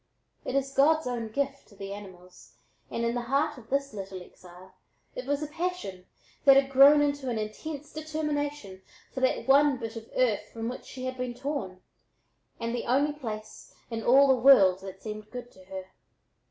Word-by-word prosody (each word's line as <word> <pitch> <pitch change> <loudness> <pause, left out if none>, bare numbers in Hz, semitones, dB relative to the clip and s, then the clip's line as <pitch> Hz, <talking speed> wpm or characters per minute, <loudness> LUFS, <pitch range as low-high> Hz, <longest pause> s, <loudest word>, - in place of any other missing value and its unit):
It 255 - -3
is 275 0 0
God's 310 +3 +4
own 240 -2 -3
gift 275 +4 -3
to 205 - -19
the 195 0 -6
animals 185 -3 -13 0.3
and 235 - -2
in 235 - 0
the 245 - -1
heart 275 +4 0
of 225 - -17
this 275 0 -1
little 195 -2 -6
exile 180 +1 -15 0.4
it - - -7
was 285 +1 0
a - - -3
passion 305 - -4 0.4
that 275 -1 +8
had 275 0 +3
grown 280 +2 +8
into 285 -2 -1
an 235 - -1
intense 280 +8 -6
determination 295 -9 -3 0.3
for 265 - -3
that 260 0 0
one 280 0 +5
bit 225 -1 -6
of 225 0 -9
earth 215 -5 +1
from 230 0 -4
which 250 - -7
she 255 -1 -7
had 255 0 -4
been 250 -1 -3
torn, 250 -9 -4 0.8
and 230 0 -2
the 240 - -3
only 280 +4 +2
place 215 -7 -8 0.2
in 225 -1 -3
all 270 +4 +6
the 265 - +6
world 195 -9 +7
that 190 0 -10
seemed 215 -1 -7
good 245 -1 -8
to 185 - -18
her. 190 0 -8
250 Hz, 190 wpm, -28 LUFS, 210-280 Hz, 0.8 s, that